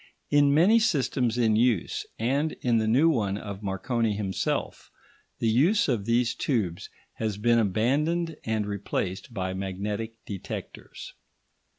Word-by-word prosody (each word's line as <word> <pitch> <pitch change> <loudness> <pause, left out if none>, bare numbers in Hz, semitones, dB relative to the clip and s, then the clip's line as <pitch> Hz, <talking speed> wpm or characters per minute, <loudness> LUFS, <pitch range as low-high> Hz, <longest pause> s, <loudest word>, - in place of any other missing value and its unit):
In 145 -1 +5
many 180 +10 +5
systems 135 - +1
in 110 -3 +3
use, 115 -4 +1
and 140 +7 0
in 120 -2 +3
the 110 - 0
new 130 +9 +4
one 105 -11 +1
of 100 -1 -7
Marconi 105 +3 -1
himself, 95 -3 -3 0.5
the 115 - -1
use 150 - +3
of 115 -8 0
these 115 +1 +2
tubes 100 - -2 0.3
has 110 -3 -2
been 115 +2 +3
abandoned 145 - +1
and 110 -2 -1
replaced 100 +2 -3
by 95 -4 -3
magnetic 100 +4 -4
detectors. 100 -3 -8
115 Hz, 130 wpm, -27 LUFS, 100-135 Hz, 0.5 s, In